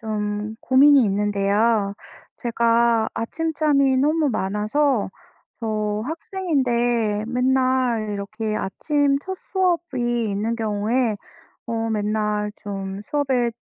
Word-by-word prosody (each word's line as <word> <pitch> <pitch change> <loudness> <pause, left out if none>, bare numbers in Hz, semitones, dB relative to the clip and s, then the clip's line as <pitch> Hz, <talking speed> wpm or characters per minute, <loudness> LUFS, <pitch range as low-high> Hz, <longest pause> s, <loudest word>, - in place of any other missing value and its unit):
좀 210 -1 -3
고민이 275 0 +6
있는데요. 205 +1 +1 0.4
제가 235 -1 +2
아침잠이 290 0 +1
너무 300 +3 +2
많아서 215 +5 0 0.5
저 215 -2 -1
학생인데 245 - 0
맨날 255 -3 +1
이렇게 210 +2 -3
아침 285 +8 0
첫 380 +4 -5
수업이 320 - -1
있는 215 +4 -1
경우에 220 +1 0 0.5
어 235 - -4 0.2
맨날 210 -1 -1
좀 195 -1 -6
수업에 260 -1 0
230 Hz, 205 characters per minute, -22 LUFS, 210-270 Hz, 0.5 s, 고민이